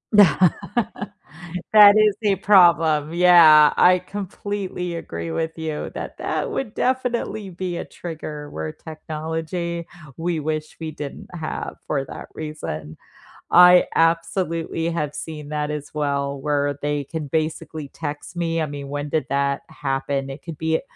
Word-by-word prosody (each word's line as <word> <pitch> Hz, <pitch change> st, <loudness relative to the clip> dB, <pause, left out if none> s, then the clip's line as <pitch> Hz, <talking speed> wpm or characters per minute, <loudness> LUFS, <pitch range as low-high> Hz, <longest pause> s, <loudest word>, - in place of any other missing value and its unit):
Th 205 Hz, -2 st, +9 dB, 1.5 s
that 205 Hz, -1 st, +9 dB
is 215 Hz, -2 st, +4 dB
a 205 Hz, -2 st, +3 dB
problem, 165 Hz, -6 st, +4 dB
yeah, 170 Hz, -4 st, +7 dB
I 180 Hz, 0 st, +5 dB
completely 195 Hz, -2 st, -5 dB
agree 85 Hz, -, -5 dB
with 160 Hz, -, -3 dB
you 160 Hz, -2 st, -4 dB
that -, -, -7 dB
that -, -, -2 dB
would 225 Hz, -6 st, -3 dB
definitely 245 Hz, -5 st, -1 dB
be 180 Hz, 0 st, -4 dB
a -, -, -4 dB
trigger 150 Hz, -3 st, -7 dB
where 80 Hz, 0 st, -5 dB
technology 160 Hz, -, -5 dB, 0.3 s
we 165 Hz, 0 st, -2 dB
wish 155 Hz, 0 st, -4 dB
we 160 Hz, -1 st, -5 dB
didn't 145 Hz, -2 st, -8 dB
have 160 Hz, -3 st, -5 dB
for 140 Hz, -3 st, -1 dB
that -, -, -9 dB
reason. 115 Hz, -, -6 dB, 0.5 s
I 180 Hz, +1 st, +8 dB
absolutely 165 Hz, 0 st, 0 dB
have 150 Hz, -4 st, -2 dB
seen 150 Hz, -2 st, -7 dB
that 150 Hz, 0 st, -2 dB
as 150 Hz, -1 st, -6 dB
well, 140 Hz, -2 st, -1 dB
where 145 Hz, -1 st, 0 dB
they 145 Hz, 0 st, -1 dB
can 155 Hz, +1 st, -5 dB
basically 155 Hz, 0 st, -3 dB
text 150 Hz, +3 st, -6 dB
me, 165 Hz, -1 st, -1 dB
I -, -, +1 dB
mean, 145 Hz, -1 st, -7 dB
when 145 Hz, +1 st, -4 dB
did 155 Hz, +1 st, -1 dB
that 140 Hz, 0 st, 0 dB
happen? 135 Hz, 0 st, -2 dB
It 135 Hz, +2 st, -8 dB
could 165 Hz, -3 st, -7 dB
be 160 Hz, +1 st, 0 dB
160 Hz, 145 wpm, -22 LUFS, 145-175 Hz, 1.5 s, Th